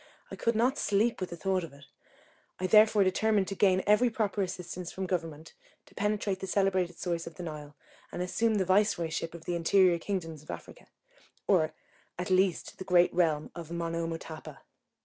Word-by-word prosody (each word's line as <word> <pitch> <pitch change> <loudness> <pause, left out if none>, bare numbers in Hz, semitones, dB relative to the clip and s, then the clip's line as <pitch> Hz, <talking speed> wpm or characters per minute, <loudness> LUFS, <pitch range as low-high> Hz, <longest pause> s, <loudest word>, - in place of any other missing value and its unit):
I - - -5
could 230 0 0
not 250 +5 +2
sleep 210 +3 +1
with 185 - -2
the 170 - -6
thoughts 185 +2 0
of 165 - -9
it; 140 0 -15 0.7
I 185 - -1
therefore 215 +1 +6
determined 200 +1 +2
to 195 - -4
gain 190 -1 +3
every 210 +4 +4
proper 215 -3 -1
assistance 180 -1 -5
from 190 - -4
Government 165 -4 -4 0.3
to - - -21
penetrate 205 -1 -1
the 190 - -5
celebrated 185 -2 +1
source 170 -2 -3
of 165 - -9
the 180 - -7
Nile, 150 -3 -8 0.4
and 180 - -3
assume 220 +5 +1
the 195 -2 +1
viceroyship 175 -4 +1
of 165 - -11
the 175 - -2
interior 175 +1 +4
kingdoms 165 -5 -4
of 155 - -21
Africa, - - -9 0.6
or, 160 -5 +2 0.4
at 180 +1 -4
least, 185 -1 +1
the - - -4
great 180 -1 +4
realm 160 -4 +1
of 170 -3 -8
Monomotapa. 165 -3 -5
180 Hz, 180 wpm, -30 LUFS, 165-200 Hz, 0.7 s, therefore